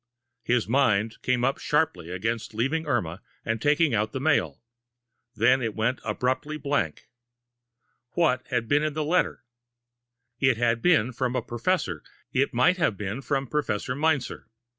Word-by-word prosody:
His 120 -2 +1
mind 115 -4 +1
came 125 -1 +1
up 135 +2 +1
sharply 150 - 0
against 110 +5 -3
leaving 150 +8 0
Irma 85 - -1 0.2
and 115 -1 -1
taking 150 0 +3
out 110 0 0
the 135 - -2
mail; 145 -2 +1 0.7
then 125 +4 +4
it 115 -3 -2
went 115 +4 0
abruptly 130 +4 -1
blank. 140 - -2 1.1
What 140 -7 +2
had 115 -1 -1
been 145 +3 +3
in 155 -1 -1
the 155 -1 -1
letter? 175 0 +1 1.0
It 130 -3 +3
had 115 -1 +1
been 130 -10 +3
from 125 +1 -1
a 125 - 0
professor 120 - -1 0.3
it 140 +2 +2
might 130 +10 +3
have 115 - +1
been 105 +6 -4
from 135 0 -1
Professor 125 -4 -2
Meinzer. 145 -2 -1
125 Hz, 150 wpm, -26 LUFS, 115-145 Hz, 1.1 s, then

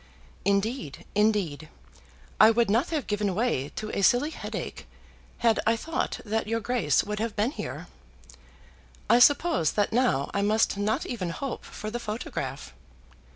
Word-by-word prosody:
Indeed, 200 - -1
indeed, 200 -8 +1 0.7
I 215 - +9
would 225 -2 +2
not 235 +9 +2
have 305 -5 -2
given 205 -3 -1
way 205 - 0
to 215 0 -4
a - - -2
silly 245 +9 +3
headache, - - -6 0.5
had 230 -2 +2
I 225 - +4
thought 325 +8 -3
that 220 0 -1
your 230 +1 0
Grace 225 - +1
would 210 0 -4
have 225 -1 -2
been 215 +5 +1
here. - - -6 1.3
I 235 - +6
suppose 290 - +4
that 205 +1 0
now 240 - +1
I 200 - 0
must 215 +1 +2
not 205 +2 -1
even 195 -8 -3
hope 260 +9 -5
for 215 - -7
the 240 - -3
photograph. 145 - -5
215 Hz, 155 wpm, -27 LUFS, 200-240 Hz, 1.3 s, I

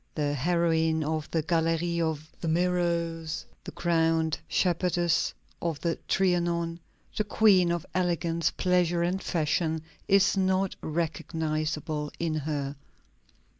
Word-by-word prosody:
The 145 -2 0
heroine 160 +1 +1
of 155 0 -2
the 160 -2 0
Gallery 165 +1 +1
of 155 -1 -2
the - - -2
Mirrors, 170 -1 0 0.2
the - - -6
crowned 165 -2 +1
shepherdess 175 -1 +1 0.3
of 165 -4 -2
the 170 -1 -1
Trianon, 170 -2 +1 0.4
the 215 - +1
queen 200 -4 +4
of 170 -2 -2
elegance, 170 -2 +1
pleasure, 175 -2 +1
and 185 +2 0
fashion 160 -1 0 0.2
is 195 +1 +4
not 190 0 +1
recognizable 155 -1 -2
in 165 -2 0
her. 145 -2 -3
165 Hz, 115 wpm, -28 LUFS, 160-175 Hz, 0.4 s, queen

